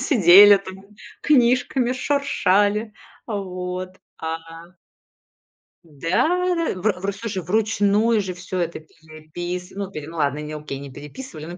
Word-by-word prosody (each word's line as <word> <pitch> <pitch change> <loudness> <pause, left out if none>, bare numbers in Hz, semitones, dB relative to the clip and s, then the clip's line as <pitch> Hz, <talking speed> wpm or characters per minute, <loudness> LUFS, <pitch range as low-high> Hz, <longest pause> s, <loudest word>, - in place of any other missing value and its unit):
сидели 205 - +7
там 190 0 -11 0.4
книжками 250 -2 +2
шуршали. 215 -6 +1 0.3
Вот, 185 -3 -5 0.2
а 160 0 -3 1.5
Да, 165 - 0 0.3
да. 335 -1 -1
Вр 205 -4 0
вр 195 +2 -2
у, - - 0
слушай, 200 -2 -5
вручную 215 +2 +2
же 190 -2 -3
всё 180 +1 -6
это 170 -2 -3
перепис 160 +3 -8
ну, 195 -1 -6
пере 150 -3 -7
ну, 165 0 -9
ладно, 145 -1 0
не 150 0 -6
окей, 150 -2 -6
не 140 -1 -9
переписывали, 155 - -10
но 175 +2 -8
185 Hz, 135 wpm, -22 LUFS, 165-215 Hz, 1.5 s, сидели